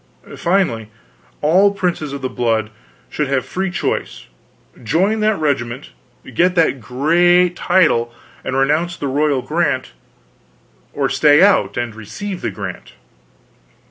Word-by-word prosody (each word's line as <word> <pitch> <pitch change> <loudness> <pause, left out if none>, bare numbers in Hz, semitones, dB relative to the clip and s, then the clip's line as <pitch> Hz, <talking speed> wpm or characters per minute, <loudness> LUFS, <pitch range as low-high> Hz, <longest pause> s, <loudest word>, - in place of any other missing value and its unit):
Finally, 170 - 0 0.5
all 185 +7 +4
princes 175 -7 -2
of 140 -1 -7
the - - 0
blood 115 -4 -1 0.4
should 150 - -2
have 135 -1 0
free 190 +1 -3
choice; 180 - -3 0.6
join 190 - +1
that 215 0 +1
regiment, 130 -4 -2 0.4
get 180 +7 +2
that 160 -6 +2
great 175 +9 +3
title, 155 -12 +2 0.3
and 130 - -2
renounce 155 +6 +1
the - - -5
royal 140 -1 0
grant, - - -1 1.0
or - - -1
stay 150 +2 +4
out 120 - +3
and 120 -2 -2
receive 115 - -7
a - - 0
grant. - - -8
150 Hz, 125 wpm, -18 LUFS, 125-180 Hz, 1.0 s, all